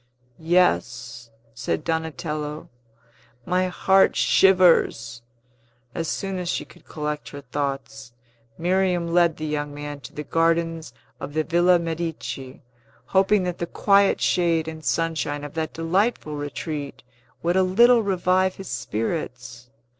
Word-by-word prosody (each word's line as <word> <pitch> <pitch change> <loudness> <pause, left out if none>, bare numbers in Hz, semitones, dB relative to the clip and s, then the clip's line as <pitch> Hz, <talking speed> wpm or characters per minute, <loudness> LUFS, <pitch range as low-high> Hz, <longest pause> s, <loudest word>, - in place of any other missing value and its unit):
"Yes," 125 - 0 0.2
said 120 +6 -3
Donatello; 160 -2 -3 0.8
"my 185 +1 +1
heart 190 +1 +3
shivers." 165 -11 +3 0.7
As 165 -1 -3
soon 195 +1 -3
as 180 -1 -4
she - - -2
could - - -19
collect 150 -2 -5
her 145 - -9
thoughts, 135 -1 -4 0.5
Miriam 180 -1 0
led 170 -2 +3
the 155 - -4
young 145 -1 -3
man 145 0 -6
to 125 - -11
the 150 - -6
gardens 165 -1 0 0.3
of 145 - -7
the 155 - +2
Villa 175 +2 +4
Medici, 165 -6 -5 0.4
hoping 195 +1 +3
that 180 -1 -3
the 170 - -2
quiet 200 +1 +3
shade 165 -3 +1
and 160 -1 -7
sunshine 155 -3 -1
of 145 - -7
that 160 -1 -3
delightful 165 0 0
retreat 145 +1 -5 0.4
would 175 +1 +1
a 190 - +4
little 235 +6 +5
revive 185 -1 +1
his 195 - -9
spirits. 120 0 -4
165 Hz, 130 wpm, -23 LUFS, 145-180 Hz, 0.8 s, little